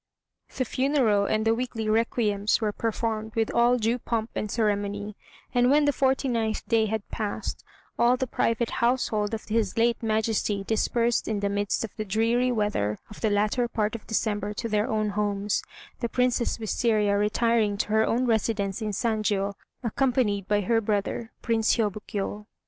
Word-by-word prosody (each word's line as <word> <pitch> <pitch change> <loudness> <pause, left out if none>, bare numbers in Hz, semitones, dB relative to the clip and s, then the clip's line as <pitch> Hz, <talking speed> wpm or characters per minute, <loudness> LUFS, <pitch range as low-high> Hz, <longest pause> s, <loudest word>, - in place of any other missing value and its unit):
The 255 - +1
funeral 255 -6 +2
and 215 0 0
the 225 - +4
weekly 230 -2 -3
requiems 215 -2 +1
were 215 -2 0
performed 220 0 -2
with 225 -1 0
all 240 +1 +4
due 235 +2 0
pomp 230 -1 -2
and 210 - -3
ceremony, 205 -1 -1 0.4
and 245 0 +4
when 290 +2 +4
the 290 - +3
forty 265 0 +1
ninth 225 -3 -1
day 225 -2 +3
had 220 -1 -3
passed, 210 -2 -4 0.4
all 245 +1 +4
the 260 - -1
private 230 -1 0
household 230 -3 +1
of 220 - -7
his 220 -2 -1
late 235 +1 +2
Majesty 215 -2 0
dispersed 230 +2 +1
in 215 -2 -1
the 200 - 0
midst 205 +2 -1
of 225 - -7
the 215 - -2
dreary 230 +5 +1
weather 210 - 0
of 210 - -11
the 220 - +2
latter 210 +4 +1
part 215 -3 -1
of 230 - -7
December 210 -2 -1
to 230 - -3
their 215 +2 0
own 215 -3 0
homes; 205 0 -1 0.4
the 235 - -2
Princess 250 -1 +1
Wistaria 215 -2 +1
retiring 210 0 +2
to 210 - -2
her 220 +1 +3
own 240 +3 +1
residence 220 -3 0
in 215 -1 -2
Sanjiô, 205 -2 0 0.3
accompanied 235 -5 +1
by 205 0 +2
her 225 +3 +2
brother, 215 +2 -2
Prince 225 -2 +2
Hiôbkiô. 210 -1 -3
220 Hz, 170 wpm, -26 LUFS, 210-235 Hz, 0.4 s, the